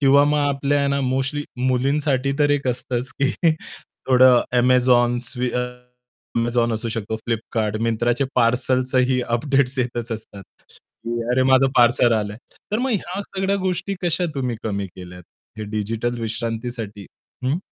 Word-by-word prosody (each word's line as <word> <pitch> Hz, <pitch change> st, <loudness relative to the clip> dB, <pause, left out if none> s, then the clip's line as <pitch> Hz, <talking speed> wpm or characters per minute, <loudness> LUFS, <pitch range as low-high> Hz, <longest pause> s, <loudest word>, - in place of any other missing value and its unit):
किंवा 140 Hz, 0 st, +6 dB
मग 150 Hz, 0 st, +2 dB
आपल्या 140 Hz, 0 st, +1 dB
ना 140 Hz, 0 st, 0 dB
मोस्टली 135 Hz, +3 st, -1 dB
मुलींसाठी 135 Hz, +2 st, +1 dB
तर 145 Hz, -1 st, +3 dB
एक 145 Hz, -2 st, +1 dB
असतंच 125 Hz, 0 st, -3 dB
की 135 Hz, -, +3 dB, 0.8 s
थोडं 125 Hz, -1 st, +6 dB, 0.2 s
Amazon, 125 Hz, -1 st, +4 dB
स्वी 125 Hz, -1 st, -2 dB
अ, 125 Hz, -, -1 dB, 0.8 s
Amazon 120 Hz, 0 st, +1 dB
असू 115 Hz, +2 st, -3 dB
शकतो, 110 Hz, -1 st, -3 dB
Flipkart, 110 Hz, -1 st, -1 dB
मिंत्राचे 120 Hz, +3 st, +1 dB
पार्सलचंही 125 Hz, +1 st, +2 dB, 0.2 s
अपडेट्स 135 Hz, 0 st, 0 dB
येतच 120 Hz, -1 st, -2 dB
असतात, 110 Hz, -3 st, -8 dB, 0.3 s
की 120 Hz, 0 st, -6 dB
अरे 130 Hz, +1 st, +3 dB
माझं 130 Hz, +1 st, +5 dB
पार्सल 120 Hz, 0 st, +5 dB
आलंय. 105 Hz, -1 st, -1 dB, 0.4 s
तर 215 Hz, -, +2 dB
मग 260 Hz, +1 st, 0 dB
ह्या 195 Hz, -2 st, -2 dB
सगळ्या 195 Hz, 0 st, -1 dB
गोष्टी 185 Hz, +2 st, -2 dB
कशा 175 Hz, 0 st, +1 dB
तुम्ही 125 Hz, -4 st, -2 dB
कमी 100 Hz, -2 st, -2 dB
केल्या, 90 Hz, -1 st, -10 dB, 0.4 s
हे 110 Hz, -, -4 dB
डिजिटल 115 Hz, +3 st, -2 dB
विश्रांतीसाठी, 115 Hz, -2 st, -4 dB, 0.4 s
हं? 135 Hz, +6 st, +1 dB
125 Hz, 140 wpm, -22 LUFS, 115-140 Hz, 0.8 s, किंवा